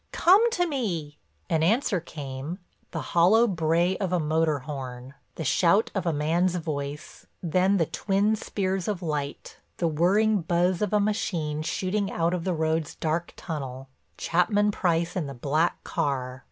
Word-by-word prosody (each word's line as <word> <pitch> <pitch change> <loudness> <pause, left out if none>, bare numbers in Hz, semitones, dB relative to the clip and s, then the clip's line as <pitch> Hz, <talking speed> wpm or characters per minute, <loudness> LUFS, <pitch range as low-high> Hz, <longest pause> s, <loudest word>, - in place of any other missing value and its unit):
Come 405 +7 +5
to 355 - +2
me!" 180 - -3 0.3
An 160 -1 +1
answer 205 - +2
came, 145 0 -6 0.3
the - - -4
hollow 190 +7 +5
bray 170 -1 +1
of 190 -3 -1
a 180 - +2
motor 155 0 +1
horn, 130 -2 -7 0.2
the 160 - -4
shout 180 - +3
of 190 -4 -2
a - - +3
man's 165 +4 +1
voice, 150 -3 -5 0.2
then 185 +4 +2
the 165 - +2
twin 200 +6 +1
spears 190 -3 -2
of 200 -4 -2
light, 145 -3 -4 0.2
the 170 - +1
whirring 195 +7 +2
buzz 175 +2 +1
of 210 - 0
a 210 - +3
machine 170 -8 -1
shooting 195 +5 -1
out 170 +1 0
of 175 -2 -3
the 185 -2 0
road's 160 0 -1
dark 165 +2 -2
tunnel—Chapman 160 +8 -1
Price 170 -3 0
in 170 -6 -1
the 140 - -7
black 150 +7 0
car. 130 -2 -2
170 Hz, 155 wpm, -26 LUFS, 150-195 Hz, 0.3 s, Come